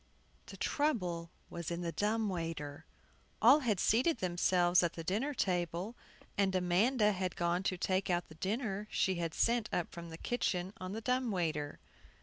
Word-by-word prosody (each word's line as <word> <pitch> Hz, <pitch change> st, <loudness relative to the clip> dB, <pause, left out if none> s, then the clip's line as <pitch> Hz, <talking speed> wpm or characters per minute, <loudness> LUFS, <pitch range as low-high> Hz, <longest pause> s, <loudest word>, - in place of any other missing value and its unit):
THE -, -, -9 dB
trouble 180 Hz, -, 0 dB, 0.2 s
was 170 Hz, -1 st, -4 dB
in 170 Hz, 0 st, -3 dB
the 170 Hz, -1 st, -2 dB
dumb 215 Hz, +4 st, 0 dB
waiter. 165 Hz, -6 st, -4 dB, 0.5 s
All 260 Hz, +6 st, +7 dB
had 225 Hz, -9 st, 0 dB
seated 250 Hz, -, +3 dB
themselves 180 Hz, -1 st, +3 dB
at 175 Hz, -1 st, 0 dB
the 165 Hz, -, -6 dB
dinner 225 Hz, -, -1 dB
table, 180 Hz, +2 st, -1 dB, 0.4 s
and 190 Hz, -1 st, +2 dB
Amanda 210 Hz, +6 st, +3 dB
had 185 Hz, -3 st, -2 dB
gone 175 Hz, +1 st, +1 dB
to 190 Hz, -1 st, -1 dB
take 190 Hz, +1 st, 0 dB
out 175 Hz, -1 st, 0 dB
the -, -, -13 dB
dinner 205 Hz, -, -2 dB
she 190 Hz, -, +1 dB
had 165 Hz, -1 st, -3 dB
sent 235 Hz, -2 st, +2 dB
up 175 Hz, -, -1 dB
from 170 Hz, -1 st, -8 dB
the 160 Hz, -, -8 dB
kitchen 185 Hz, -4 st, -1 dB
on 185 Hz, +1 st, -5 dB
the 220 Hz, -, -4 dB
dumb 250 Hz, +1 st, +1 dB
waiter. 160 Hz, -7 st, -1 dB
185 Hz, 170 wpm, -34 LUFS, 170-220 Hz, 0.5 s, All